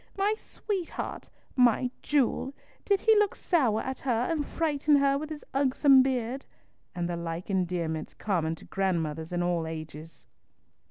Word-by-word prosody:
My 400 +2 +2
sweetheart! 395 -4 -5 0.3
My 250 0 +3
jewel! 275 -1 0 0.3
Did 400 -1 +2
he 445 -1 +5
look 420 -1 +2
sour 250 - +1
at 265 0 -4
her 240 -3 0
and 310 -3 0
frighten 300 -1 +1
her 275 -1 +3
with 300 +2 -4
his 310 -1 -7
ugsome 270 0 +5
beard?" 260 0 -1 0.5
and 175 -1 -1
the 175 - -2
like 170 +2 -5
endearments 170 -4 -2
common 165 -6 -1
to - - -15
grandmothers 165 -4 -2
in 175 0 0
all 175 -2 0
ages. 155 -1 -8
240 Hz, 150 wpm, -28 LUFS, 170-285 Hz, 0.5 s, he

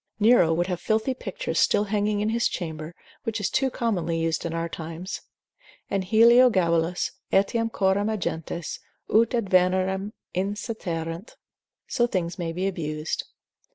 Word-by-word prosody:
Nero 215 -6 +5
would 170 +2 +1
have 180 -2 -3
filthy 220 +6 +1
pictures - - -3
still 205 - +4
hanging 205 0 0
in 210 - +1
his 235 +1 +2
chamber, 160 -1 -5 0.3
which 225 -1 -3
is 205 - -1
too 265 0 +2
commonly 180 -10 -1
used 165 0 -1
in - - -4
our 165 0 -2
times, 165 +3 -6 0.7
and 195 -1 0
Heliogabalus, 190 -6 +4 0.2
etiam 225 +4 +2
coram 200 +1 +1
agentes, 170 -5 -3 0.3
ut 230 +2 +4
ad 230 -4 0
venerem 185 +2 +2 0.2
incitarent: 185 -3 -3 0.5
So 240 - +1
things 180 -5 -2
may 170 -1 -2
be 180 +3 -2
abused. 155 -4 -3
190 Hz, 140 wpm, -25 LUFS, 170-220 Hz, 0.7 s, Nero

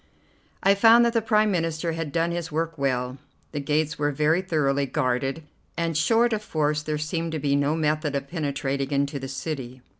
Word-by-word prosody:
I 195 - +6
found 230 +4 +6
that 235 - +1
the 230 - +2
Prime 215 -1 +2
Minister 165 -2 -1
had 165 -2 -4
done 165 +2 0
his 170 0 -4
work 165 +1 -2
well. 130 -2 -1 0.3
The 150 - -3
gates 150 +2 -1
were 145 0 +1
very 150 +5 +2
thoroughly 140 -6 0
guarded, 135 +2 -1 0.3
and 165 -1 -1
short 225 +9 +3
of 215 - -1
force 150 -6 0
there 150 0 -2
seemed 165 +2 -3
to 160 - -2
be 140 -1 +1
no 145 +2 +1
method 155 -2 0
of 140 0 -3
penetrating 140 -4 -2
into 140 0 0
the 135 - -6
city. 130 -3 -5
155 Hz, 190 wpm, -25 LUFS, 140-165 Hz, 0.3 s, I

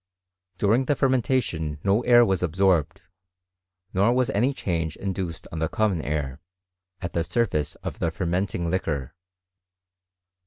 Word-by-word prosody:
During 110 +7 +2
the 145 - +2
fermentation 120 - 0
no 100 +3 +3
air 120 -1 +6
was 95 -4 0
absorbed, 90 0 +1 0.9
nor 100 +5 +3
wa3 130 -1 +2
any 120 +7 +2
change 85 - -2
induced 95 -3 -4
on 80 - -4
the 80 0 0
common 100 -4 +1
air, 75 -3 -3 0.6
at 90 -2 -4
the 85 - +1
surface 85 - 0
of - - -5
the 85 - +1
fermenting 85 0 -1
liquor. 75 -8 -2
95 Hz, 130 wpm, -25 LUFS, 80-110 Hz, 0.9 s, air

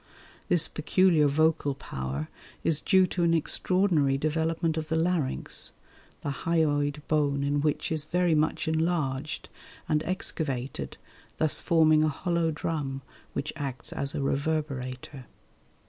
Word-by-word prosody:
This 170 -3 +4
peculiar 160 -1 +3
vocal 150 -1 +2
power 70 - -4 0.4
is 155 -2 +2
due 190 -1 +5
to 180 0 -3
an 170 -1 +4
extraordinary 165 -4 +2
development 160 +2 0
of 160 -1 -3
the 160 - -1
larynx, 165 -4 0 0.5
the 145 - -2 0.2
hyoid 145 -3 +1
bone 145 -2 +1
in 145 +1 +1
which 150 +1 0
is 155 -2 -1
very 175 +1 +2
much 155 +1 +1
enlarged 155 -3 -1 0.4
and 150 -1 +2
excavated, 135 - -3 0.4
thus 155 -2 +1
forming 155 -2 +4
a 155 - +3
hollow 170 +2 0
drum 145 -3 -3 0.3
which 145 - -3
acts 140 -4 -5
as 140 0 -3
a 140 - -1
reverberator. 135 -3 -2
155 Hz, 130 wpm, -28 LUFS, 140-165 Hz, 0.5 s, due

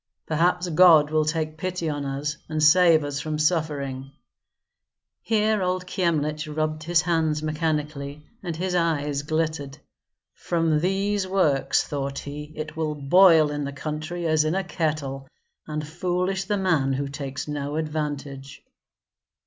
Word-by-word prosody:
Perhaps 175 +3 +1
God 160 -3 +6
will 155 -1 +2
take 155 0 -2
pity 180 -1 -3
on 145 -2 -2
us, 140 +2 -3
and 155 -1 -1
save 160 0 +6
us 145 -1 -3
from 155 0 -3
suffering." 150 -4 -1 1.1
Here 215 -1 +1
old 180 0 -1
Kyemlich 155 -4 -1
rubbed 155 0 -2
his 175 +2 +2
hands 160 -3 0
mechanically, 150 -2 -2 0.2
and 175 -4 -4
his 180 +2 -2
eyes 150 -5 0
glittered. 155 -2 -2 0.6
"From 165 -3 0
these 195 +3 0
works," 170 -8 +2
thought 140 -1 -4
he, 150 +1 -7
"it 155 +1 -6
will 155 -1 -2
boil 160 +1 +5
in 145 0 -3
the 140 - -4
country 155 +4 -5
as 155 -1 +3
in 155 +3 0
a 195 - 0
kettle, 150 -6 -3 0.4
and 150 -1 -4
foolish 180 +3 -1
the 205 +1 0
man 160 -8 +1
who 140 +1 -2
takes 135 -1 -5
no 145 0 -3
advantage." 145 -3 -4
155 Hz, 140 wpm, -24 LUFS, 145-175 Hz, 1.1 s, God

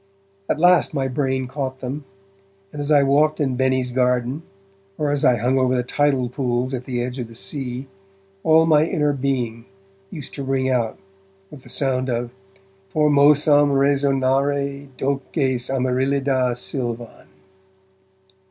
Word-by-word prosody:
At - - +1
last 175 -2 +4
my 135 -2 0
brain 130 -1 -1
caught 130 0 -4
them, 135 +3 -5 0.7
and 150 - -8
as 145 - -4
I 145 -2 +5
walked 145 +3 +2
in 135 -4 0
Benny's 130 -1 0
garden, 125 +2 0 0.6
or 150 -1 0
as 145 -1 -1
I 125 - +5
hung 125 +4 +1
over 130 0 +2
the 125 - 0
tidal 135 0 +1
pools 125 0 -2
at 125 -1 -4
the 120 -2 -2
edge 125 +1 -5
of 120 - -4
the 115 - -14
sea, 125 +5 -4 0.6
all 160 0 +5
my 155 -2 +4
inner 150 -3 0
being 125 -4 -2 0.4
used 145 -4 -8
to 140 - -5
ring 135 -1 0
out 120 -4 0 0.5
with 145 - -11
the - - -16
sound 130 -2 0
of 120 0 -2 0.6
Formosam 145 -1 +4
resonare 140 0 +1
doces 135 -2 -1
Amaryllida 130 0 0
silvan. 120 +1 -5
135 Hz, 145 wpm, -21 LUFS, 125-145 Hz, 0.7 s, I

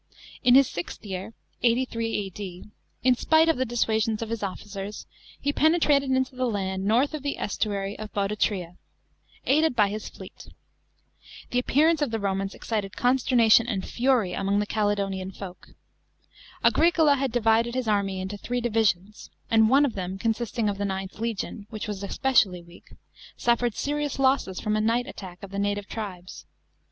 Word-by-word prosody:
In 245 0 +6
his 270 -1 +7
sixth 175 +5 -6
year 195 +3 -6 0.3
(83 230 -1 +1
A.D.), 190 -1 -8 0.4
in 255 0 +5
spite 315 +5 +3
of 325 - +3
the 260 - 0
dissuasions 225 -1 0
of 225 - -7
his 230 - -3
officers, 200 +1 -6 0.3
he 285 - -1
penetrated 300 -4 +3
into 260 0 0
the 255 0 0
land 190 -2 -2
north 245 +9 +2
of 305 - -4
the 280 +1 -2
sestuary 200 -1 -2
of 215 -1 -7
Bodotria, 195 -3 -1 0.7
aich 290 +4 +4
d 320 - +4
by 215 -6 +2
his 215 +1 -5
fleet. - - -12 1.0
The 245 - +2
appearance 310 +5 +3
of 290 - +1
the 225 - -1
Romans 195 0 -2
excited 210 -3 -4
consternation 245 -2 +4
and 200 -6 -2
fury 240 -7 +1
among 195 +2 0
the 210 - +1
Caledonian 200 -3 -1
folk. 185 -2 -9 1.0
Auricola 325 -3 +4
had 270 -2 -1
divided 230 0 +2
his 255 -3 -1
army 200 -3 0
into 190 +2 -5
three 245 +4 -2
divisions, 215 -4 0 0.2
and 220 -1 +5
one 275 +3 +5
of 260 - -2
them, 185 0 -4
consisting 230 +1 -1
of 200 -1 -2
the 205 - 0
IXth 190 0 -4
legion, 220 -2 -4
which 220 -1 -5
was 205 -2 -5
especially 200 -4 +1
weak, 170 +1 -17 0.5
suffered 240 -1 +1
S"rious 290 +3 -2
losses 265 -8 +1
from 210 0 -1
a 215 - +1
night 230 +3 +1
attack 185 -9 -10
of 200 - -8
the 200 - -3
native 205 0 -1
tribes. 185 -5 -7
220 Hz, 165 wpm, -26 LUFS, 195-250 Hz, 1.0 s, his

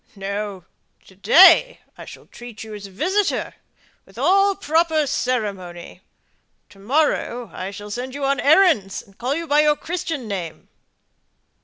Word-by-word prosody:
"No; 200 -1 -5 0.4
to 190 - -19
day 365 - +6 0.2
I - - -11
shall - - -13
treat 240 -3 -11
you 220 -1 -10
as 205 -1 -8
a - - -15
visitor, 370 - -1 0.5
with - - -21
all 395 +1 +3
proper 320 -1 +1
ceremony. 200 -10 -4 0.7
To 195 - -19
morrow 245 0 -1
I 185 +1 -6
shall 205 +1 -10
send 255 +4 -6
you 285 -1 -3
errands, 275 - +2
and 195 - -23
call 255 +6 -2
you 335 +1 -4
by 295 -1 +2
your 300 0 +4
Christian 320 -6 -5
name." 175 -6 -6
245 Hz, 145 wpm, -21 LUFS, 200-315 Hz, 0.7 s, day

